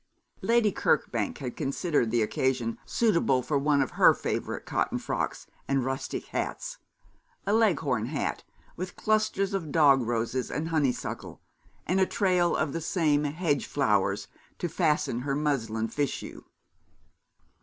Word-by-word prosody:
Lady 230 -3 +3
Kirkbank 115 - 0
had 125 -4 -5
considered 140 -3 0
the 115 0 +2
occasion 120 0 -1
suitable 170 - +2
for 150 - -2
one 140 -1 +3
of 130 - -6
her - - +6
favourite - - -3
cotton - - 0
frocks - - -3 0.2
and 135 -2 +1
rustic 135 0 -3
hats - - -3 0.7
a 200 - +1
Leghorn 145 - +2
hat, 145 +1 -2 0.3
with 185 +1 -6
clusters 215 -2 +1
of 165 -6 -3
dog 140 -4 +5
roses 120 +2 -1
and 160 +2 -3
honeysuckle, 145 -6 -2 0.5
and 185 +3 +1
a 190 - +4
trail 180 -3 +2
of 155 -3 -1
the 165 - -3
same 155 -3 +1
hedge 145 -1 0
flowers - - +1 0.3
to 175 - -2
fasten 155 -7 +1
her 135 +2 -2
muslin 115 -7 -1
fichu. 140 +4 -4
145 Hz, 135 wpm, -28 LUFS, 130-175 Hz, 0.7 s, her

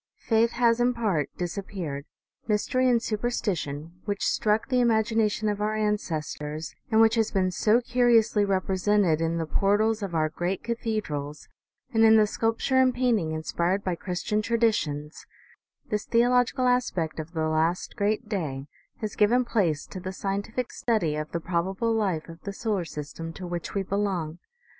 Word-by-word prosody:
Faith 230 0 +3
has 235 -1 +3
in 245 0 +2
part 195 - 0
disappeared; 175 -5 -4 0.4
mystery 255 +4 +2
and 235 -2 +2
superstition, 180 -8 -3
which 205 -1 -2
struck 215 +1 +1
the 255 -2 +2
imagination 220 -2 +2
of 205 0 -1
our 215 +1 0
ancestors, 160 -7 -3 0.2
and 220 -2 +3
which 225 0 +5
has 225 -2 +2
been 185 -2 +1
so 215 +5 +3
curiously 235 -3 +3
represented 190 -3 +1
in 165 0 0
the 165 - -1
portals 210 +6 +1
of 190 -4 -4
our 155 -1 +2
great 175 +4 -3
cathe 230 -2 -2
drals, 145 0 -6 0.5
and 225 0 +4
in 220 0 +7
the 215 - +5
sculpture 225 +5 0
and 260 -1 +4
painting 230 -10 +1
inspired 170 +4 -1
by 185 - -1
Chris 180 +1 -4
tian 215 -1 0
traditions, 210 -10 -1 0.6
this 210 0 -1
theological 245 +2 +3
aspect 210 -11 0
of 160 +2 -7
the 160 -1 0
last 160 +3 0
great 215 +3 0
day, 150 -10 -3 0.4
has 215 -2 -4
given 240 +4 +3
place 175 -11 0
to 190 - -8
the 185 +1 -5
scientific 200 +6 -3
study 210 -11 0
of 155 0 -4
the 170 - -2
probable 190 +7 -1
life 190 -8 -1
of 165 0 -11
the 200 - -5
solar 205 -4 -1
system 160 +1 -7
to 180 +2 -8
which 175 +1 -5
we 200 - +1
belong. 185 -5 -2
205 Hz, 165 wpm, -26 LUFS, 165-225 Hz, 0.6 s, in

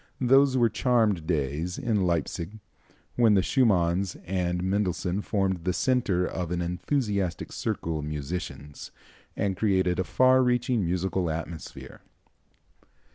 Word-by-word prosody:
Those 135 +1 +4
were 120 -2 +4
charmed 110 -10 +1
days 80 +2 -1
in 110 -8 0
Leipsic 85 0 -1 0.7
when 115 -4 +5
the 95 - +3
Schumanns 95 -7 +2
and 90 -1 -1
Mendelssohn 95 -1 -1
formed 95 -5 -1
the 90 +1 0
centre 105 -7 +1
of 90 -2 -4
an 90 0 -2
enthusiastic 95 - -2
circle 80 -2 -3
of 75 - -5
musicians, 75 -1 -6 0.5
and 100 -2 0
created 95 -3 +1
a - - +2
far 130 +6 +4
reaching 125 -2 +1
musical 90 0 -1
atmosphere. 80 0 -7
95 Hz, 125 wpm, -27 LUFS, 85-110 Hz, 0.7 s, when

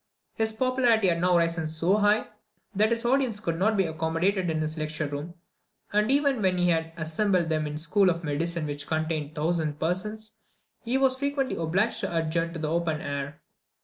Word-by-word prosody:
His 220 0 0
popularity 235 -3 +2
had 170 -1 0
now 180 -1 +4
risen 165 -1 +1
so 165 +6 +1
high, 210 0 +3 0.5
that 215 +2 +3
his 235 0 -1
audience 250 -4 +2
could 165 -4 -2
not 215 +3 +2
be 190 - +3
accommodated 165 +4 0
in 160 -1 0
his 155 0 -2
lecture 155 0 -2
room; 145 +4 -5 0.6
and 210 +2 +2
even 280 -3 +2
when 185 -2 +2
he 180 0 +2
had 165 -1 0
assembled 170 +2 +1
them 155 -1 0
in 150 - -5
the 150 - -4
school 185 +4 +3
of 170 0 -2
medicine, 165 +2 -2
which 145 -1 -4
contained 155 -1 -2
1000 155 -1 0
persons, 215 +6 -3 0.4
he 240 +3 0
was 265 -1 +2
frequently 280 -1 -1
obliged 180 +7 0
to 170 - -2
adjourn 165 +1 0
to 170 - -6
the 155 -1 -2
open 165 -2 0
air. 140 0 -5
170 Hz, 190 wpm, -27 LUFS, 160-215 Hz, 0.6 s, now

